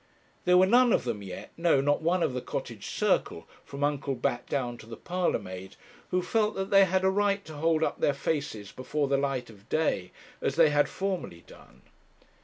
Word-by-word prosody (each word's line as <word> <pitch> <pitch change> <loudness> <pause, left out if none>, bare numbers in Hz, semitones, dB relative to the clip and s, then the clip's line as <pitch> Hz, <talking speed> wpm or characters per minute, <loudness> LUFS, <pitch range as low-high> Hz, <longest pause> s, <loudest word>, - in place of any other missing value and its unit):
There 180 0 +5
were 185 - +7
none 245 +4 +5
of - - +2
them 115 -4 -3
yet 95 -2 -8
no, 165 -4 +3
not 145 +3 +1
one 170 +2 +1
of - - 0
the 125 - -3
Cottage - - -6
circle, - - 0 0.2
from 140 +1 -6
Uncle 145 -1 0
Bat 120 0 -2
down 120 -4 -2
to 110 - -13
the 115 -1 -8
parlour 180 0 0
maid 95 +1 -9 0.3
who 180 0 0
felt 215 +3 +1
that 195 0 -3
they 195 -1 +7
had 190 0 0
a 190 - +4
right 200 0 +1
to 160 - -9
hold 160 +1 +2
up - - -1
their 145 - +2
faces 140 -8 -3
before 140 +3 -2
the 140 0 +2
light 135 -4 -2
of 100 -2 -19
day 155 - 0 0.3
as - - -1
they 160 -2 +5
had 145 0 +3
formerly 185 - -4
done. 65 +1 -17
145 Hz, 210 wpm, -28 LUFS, 125-180 Hz, 0.3 s, were